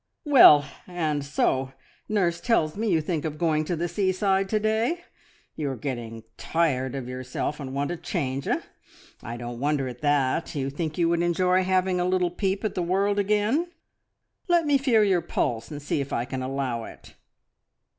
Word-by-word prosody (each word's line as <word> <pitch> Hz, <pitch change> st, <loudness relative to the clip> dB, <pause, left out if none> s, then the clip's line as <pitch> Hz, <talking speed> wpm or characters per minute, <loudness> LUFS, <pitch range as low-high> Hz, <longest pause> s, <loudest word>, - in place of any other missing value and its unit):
"Well, 235 Hz, -, +8 dB, 0.2 s
and 155 Hz, -5 st, -1 dB
so 135 Hz, -1 st, 0 dB, 0.4 s
nurse 180 Hz, -5 st, +1 dB
tells 160 Hz, -10 st, +1 dB
me 220 Hz, +2 st, -1 dB
you 165 Hz, -4 st, +3 dB
think 155 Hz, -1 st, -2 dB
of 155 Hz, -2 st, -4 dB
going 155 Hz, -2 st, +1 dB
to 175 Hz, -, -1 dB
the 170 Hz, +2 st, -2 dB
seaside 190 Hz, +1 st, +1 dB
to 215 Hz, -, +1 dB
day! 220 Hz, +10 st, 0 dB, 0.5 s
You 150 Hz, -3 st, -2 dB
are 135 Hz, -, -3 dB
getting 120 Hz, -4 st, -5 dB
tired 140 Hz, -6 st, 0 dB
of 130 Hz, -3 st, -5 dB
yourself, 130 Hz, +4 st, -4 dB
and 135 Hz, -2 st, -6 dB
want 140 Hz, +2 st, -1 dB
a 175 Hz, -, -3 dB
change 135 Hz, -4 st, -3 dB
eh? -, -, 0 dB, 0.6 s
I 115 Hz, +1 st, -6 dB
don't 120 Hz, 0 st, -6 dB
wonder 145 Hz, -1 st, 0 dB
at 125 Hz, -1 st, -8 dB
that. 145 Hz, +2 st, +1 dB
You 135 Hz, -1 st, -2 dB
think 155 Hz, +1 st, -4 dB
you 170 Hz, -2 st, +2 dB
would 170 Hz, 0 st, +1 dB
enjoy 180 Hz, +2 st, +2 dB
having 185 Hz, 0 st, +1 dB
a 180 Hz, -, +1 dB
little 180 Hz, -1 st, +1 dB
peep 195 Hz, +2 st, -1 dB
at 215 Hz, -, -1 dB
the 180 Hz, -, -2 dB
world 195 Hz, +4 st, +1 dB
again? 210 Hz, -, +1 dB, 0.8 s
Let 345 Hz, -2 st, +3 dB
me 290 Hz, -2 st, +3 dB
feel 240 Hz, -5 st, +3 dB
your 190 Hz, -4 st, +2 dB
pulse 115 Hz, -7 st, -2 dB
and 150 Hz, -2 st, -6 dB
see 145 Hz, 0 st, -2 dB
if 140 Hz, -, -6 dB
I 120 Hz, -, -1 dB
can 130 Hz, +1 st, -5 dB
allow 130 Hz, -3 st, -2 dB
it." -, -, -13 dB
165 Hz, 185 wpm, -25 LUFS, 135-190 Hz, 0.8 s, Well